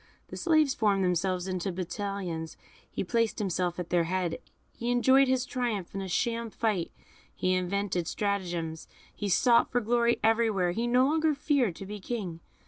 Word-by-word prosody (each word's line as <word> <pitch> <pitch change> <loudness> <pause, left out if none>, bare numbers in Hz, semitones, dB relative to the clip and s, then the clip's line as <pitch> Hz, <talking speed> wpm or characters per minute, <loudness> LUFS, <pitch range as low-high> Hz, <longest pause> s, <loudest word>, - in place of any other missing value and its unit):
The - - -7
slaves 310 -5 +3
formed 200 -3 +2
themselves 180 +1 0
into 185 0 -2
battalions, 180 -2 -4 0.3
he - - -3
placed 230 +3 0
himself 180 -3 -1
at 180 -1 -5
their 175 -1 +3
head, 180 -1 -1 0.3
he 235 - -4
enjoyed 260 +3 +5
his 255 -1 +1
triumph 240 -8 -3
in 195 - -3
a 190 - -4
sham 230 +5 -1
fight, 210 -6 -1 0.4
he 185 - +1
invented 185 -1 -1
stratagems, 175 -6 -2 0.3
he 205 - -3
sought 235 +5 +4
for 245 - +2
glory 235 +1 +2
everywhere; 220 -5 +2
he 230 +6 -1
no 250 +2 +4
longer 310 +1 +2
feared 275 - +1
to 195 - -8
be 210 +2 -6
a - - -11
king. 190 -6 -4
200 Hz, 170 wpm, -29 LUFS, 180-240 Hz, 0.4 s, enjoyed